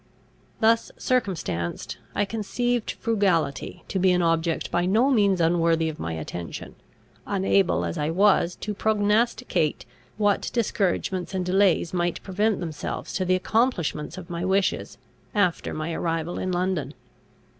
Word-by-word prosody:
Thus 225 Hz, +1 st, +3 dB
circumstanced, 180 Hz, -, -2 dB, 0.2 s
I 205 Hz, -, +2 dB
conceived 230 Hz, +3 st, -1 dB
frugality 185 Hz, -, 0 dB
to 190 Hz, -, -1 dB
be 185 Hz, 0 st, +4 dB
an 180 Hz, -1 st, +2 dB
object 165 Hz, 0 st, 0 dB
by 175 Hz, +1 st, +1 dB
no 230 Hz, +8 st, +3 dB
means 200 Hz, -6 st, +3 dB
unworthy 165 Hz, -1 st, +2 dB
of 155 Hz, -, -8 dB
my 85 Hz, -, -3 dB
attention, 80 Hz, +2 st, -6 dB, 0.5 s
unable 95 Hz, -2 st, +2 dB
as 85 Hz, -, -3 dB
I 150 Hz, -, 0 dB
was 185 Hz, 0 st, +3 dB
to 210 Hz, -, -3 dB
prognosticate 210 Hz, -4 st, +1 dB, 0.3 s
what 205 Hz, -2 st, +1 dB
discouragements 190 Hz, -4 st, -1 dB
and 185 Hz, -1 st, -1 dB
delays 185 Hz, -2 st, +2 dB
might 175 Hz, -1 st, -1 dB
present 205 Hz, +2 st, 0 dB
themselves 160 Hz, -4 st, -5 dB
to 185 Hz, -, -1 dB
the 185 Hz, 0 st, +3 dB
accomplishment 185 Hz, -, 0 dB
of 180 Hz, -2 st, -8 dB
my 170 Hz, -1 st, -4 dB
wishes, 190 Hz, +1 st, 0 dB, 0.4 s
after 180 Hz, -5 st, +1 dB
my 155 Hz, +2 st, -3 dB
arrival 165 Hz, +1 st, -2 dB
in 185 Hz, -, -2 dB
London. 180 Hz, -3 st, -1 dB
185 Hz, 135 wpm, -25 LUFS, 165-205 Hz, 0.5 s, be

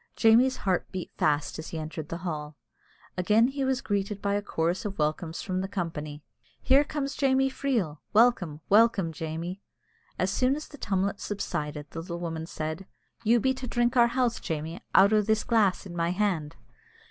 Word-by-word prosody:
Jamie's 245 Hz, +4 st, +5 dB
heart 185 Hz, -2 st, 0 dB
beat 185 Hz, -1 st, -5 dB
fast 150 Hz, +1 st, 0 dB
as 160 Hz, -, -6 dB
he 165 Hz, -, -5 dB
entered 155 Hz, 0 st, -6 dB
the 170 Hz, +2 st, -6 dB
hall. 150 Hz, -3 st, -4 dB, 0.6 s
Again 215 Hz, +6 st, +4 dB
he 275 Hz, 0 st, -3 dB
was 265 Hz, 0 st, 0 dB
greeted 200 Hz, -3 st, -2 dB
by 200 Hz, 0 st, -1 dB
a 205 Hz, -, +1 dB
chorus 170 Hz, -2 st, -1 dB
of 200 Hz, -2 st, -5 dB
welcomes 160 Hz, +2 st, -2 dB
from 185 Hz, -1 st, -2 dB
the 190 Hz, -, -3 dB
company 155 Hz, -6 st, -5 dB, 0.4 s
"Here 270 Hz, +2 st, +4 dB
comes 290 Hz, -1 st, -3 dB
Jamie 270 Hz, -1 st, +2 dB
Freel! 225 Hz, -, -1 dB
welcome, 200 Hz, -9 st, +3 dB
welcome, 205 Hz, -5 st, +4 dB
Jamie!" 165 Hz, +4 st, -5 dB, 0.6 s
As 185 Hz, +1 st, 0 dB
soon 255 Hz, +6 st, +2 dB
as 305 Hz, -, -7 dB
the 290 Hz, -, -13 dB
tumult 195 Hz, -1 st, -1 dB
subsided, 150 Hz, -7 st, -4 dB
the 165 Hz, -, -6 dB
little 170 Hz, 0 st, -6 dB
woman 165 Hz, -2 st, -4 dB
said, 160 Hz, +3 st, -5 dB, 0.4 s
"You 235 Hz, +2 st, +4 dB
be 265 Hz, +4 st, +2 dB
to 260 Hz, -1 st, -6 dB
drink 240 Hz, +1 st, +1 dB
our 240 Hz, -1 st, +6 dB
health, 240 Hz, -1 st, 0 dB
Jamie, 160 Hz, +1 st, -4 dB
out 200 Hz, +2 st, +7 dB
o' 215 Hz, -, +5 dB
this 220 Hz, +1 st, +1 dB
glass 215 Hz, -5 st, +2 dB
in 175 Hz, -3 st, -8 dB
my 170 Hz, 0 st, 0 dB
hand." 175 Hz, -5 st, -1 dB
195 Hz, 180 wpm, -28 LUFS, 165-235 Hz, 0.6 s, out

